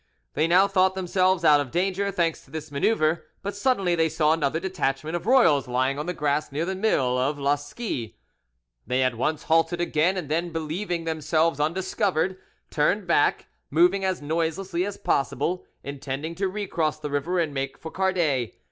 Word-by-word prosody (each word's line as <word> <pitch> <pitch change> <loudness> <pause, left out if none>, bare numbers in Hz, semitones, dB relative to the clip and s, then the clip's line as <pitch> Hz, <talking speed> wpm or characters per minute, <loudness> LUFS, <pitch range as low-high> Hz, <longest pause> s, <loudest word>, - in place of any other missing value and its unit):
They 155 - +1
now 185 +3 +5
thought 190 -1 +2
themselves 185 -1 +1
out 150 -2 +6
of 135 - -5
danger, 195 +5 0
thanks 170 -4 -1
to - - -22
this 155 0 -7
manoeuvre, 155 +2 +1 0.2
but 200 0 -4
suddenly 200 -5 +1
they 165 -1 +2
saw 155 0 +2
another 160 -1 0
detachment 160 -4 -2
of 175 +4 -4
royals 170 - +4
lying 130 +3 0
on 150 - -4
the 180 - -1
grass 150 0 -1
near 150 +4 -1
the 190 - -2
mill 135 - +1
of 140 +3 0
La 140 0 +2
Scie. 145 - -5 0.7
They 130 +1 +1
at 130 -1 +1
once 145 +6 -1
halted 165 +1 +2
again, 175 +2 +1
and 175 -5 -4
then, 165 +4 -1
believing 165 +2 -3
themselves 160 -1 0
undiscovered, 185 +2 0 0.3
turned 180 +7 +1
back, 170 -4 +2 0.2
moving 175 +6 +3
as 185 -5 -1
noiselessly 170 +4 -1
as 205 - -6
possible, 140 +6 -1 0.2
intending 140 +3 -5
to 195 +3 -1
recross 185 -6 -2
the 150 -1 -6
river 145 +6 -1
and 160 -4 0
make 135 0 -3
for 160 - -8
Cardet. 170 - 0
165 Hz, 175 wpm, -25 LUFS, 145-185 Hz, 0.7 s, out